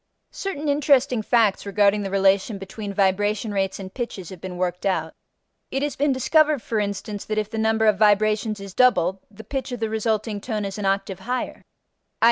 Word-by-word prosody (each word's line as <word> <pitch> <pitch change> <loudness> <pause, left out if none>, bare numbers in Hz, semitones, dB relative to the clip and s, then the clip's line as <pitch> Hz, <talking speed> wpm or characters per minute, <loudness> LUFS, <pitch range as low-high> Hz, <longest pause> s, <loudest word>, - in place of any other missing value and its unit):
Certain 310 -7 -4
interesting 280 -4 +3
facts 220 -3 +2
regarding 205 0 +2
the 195 - -3
relation 195 +2 +2
between 195 +2 -7
vibration 205 +2 +1
rates 195 -1 -1
and 190 -1 -8
pitches 220 -8 -5
have 185 -3 -10
been 185 -1 -6
worked 180 0 -2
out: 165 -5 -1 0.6
it 270 +1 -2
has 290 - -2
been 290 +1 +1
discovered 300 +3 +3
for 225 - -1
instance 205 0 -3
that 215 - -3
if 215 0 -1
the 225 - -3
number 220 0 +2
of 210 -2 +3
vibrations 215 0 +3
is 195 -1 -9
doubled, 195 -7 +3
the 215 +1 -12
pitch 265 +3 -4
of 245 - -4
the 225 -1 -2
resulting 220 -1 -1
tone 215 -2 -3
is 195 +1 -5
an 200 - -1
octave 195 -1 -1
higher; 250 +6 -3
_i. - - -25
210 Hz, 195 wpm, -23 LUFS, 195-235 Hz, 0.6 s, interesting